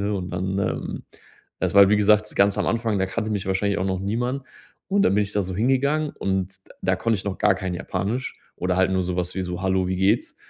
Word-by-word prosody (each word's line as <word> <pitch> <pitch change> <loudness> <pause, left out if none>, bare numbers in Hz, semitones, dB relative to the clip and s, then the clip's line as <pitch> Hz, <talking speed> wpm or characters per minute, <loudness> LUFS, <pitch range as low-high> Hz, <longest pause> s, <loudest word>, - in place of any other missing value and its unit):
ne, 105 - 0
und 90 -1 -5
dann, 95 +2 -2
ähm“ 100 -2 -3 0.6
Das - - -1
war, 100 -1 +8
wie 105 - +4
gesagt, 105 +1 +3
ganz 100 +1 +3
am 105 - 0
Anfang, 115 -3 0
da 95 - +1
kannte 110 +3 -3
mich 100 -3 -2
wahrscheinlich 100 +1 0
auch 95 - -1
noch 95 -1 -1
niemand. 120 +7 -2 0.5
Und 200 +1 +2
dann 100 - +3
bin 105 - +3
ich 100 - -7
da 105 - +1
so 95 0 -5
hingegangen 140 +6 +1
und 95 -4 -2 0.3
da 95 0 +1
konnte 115 +3 0
ich - - -8
noch 100 -2 -3
gar 105 -2 +4
kein 95 -1 -4
Japanisch 100 +8 -3 0.2
oder 90 0 -1
halt 95 0 +3
nur 95 -1 +1
sowas 90 0 -2
wie 95 - -1
so: 90 +1 -5
„Hallo, 95 -1 +1
wie 95 - -1
geht's?“ 95 +2 +1
100 Hz, 240 wpm, -23 LUFS, 95-105 Hz, 0.6 s, war